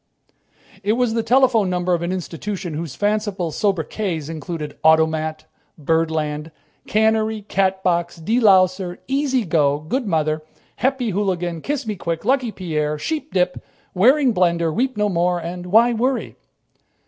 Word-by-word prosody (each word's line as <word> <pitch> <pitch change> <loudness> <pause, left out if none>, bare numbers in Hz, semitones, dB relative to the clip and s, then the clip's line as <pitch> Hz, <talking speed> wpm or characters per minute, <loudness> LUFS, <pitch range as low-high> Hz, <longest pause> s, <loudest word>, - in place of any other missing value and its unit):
It 205 +1 +1
was 240 -1 +1
the 230 - +1
telephone 235 -3 +3
number 180 0 0
of 170 - 0
an 170 +1 -2
institution 185 0 -4
whose 155 -2 -5
fanciful 205 -4 -1
sobriquets 180 -3 -2
included: 160 -1 -5
"Automat," 160 0 +2 0.3
"Birdland," 160 -1 -1 0.4
"Cannery," 220 0 +1
"Catbox," 185 -3 0
"De 230 +4 +2
louser," 185 -4 +3
"Easy 265 -3 0
go," 150 -4 +2
"Good 255 - -1
by, - - -3
Mother," 155 -2 0 0.4
"Happy 260 -3 0
Hooligan," 180 -4 -1
"Kiss 280 - -3
me 215 -1 -3
quick," 170 0 -4
"Lucky 255 -2 +1
Pierre," 155 -6 -2
"Sheepdip," 190 - -1 0.3
"Waring 255 +7 +4
Blendor," 170 -3 +1
"Weep 255 +3 -1
no 210 0 +2
more" 180 -1 +1
and 175 +1 -6
"Why 230 +6 +5
Worry?" 250 +3 -1
185 Hz, 135 wpm, -21 LUFS, 165-220 Hz, 0.4 s, Why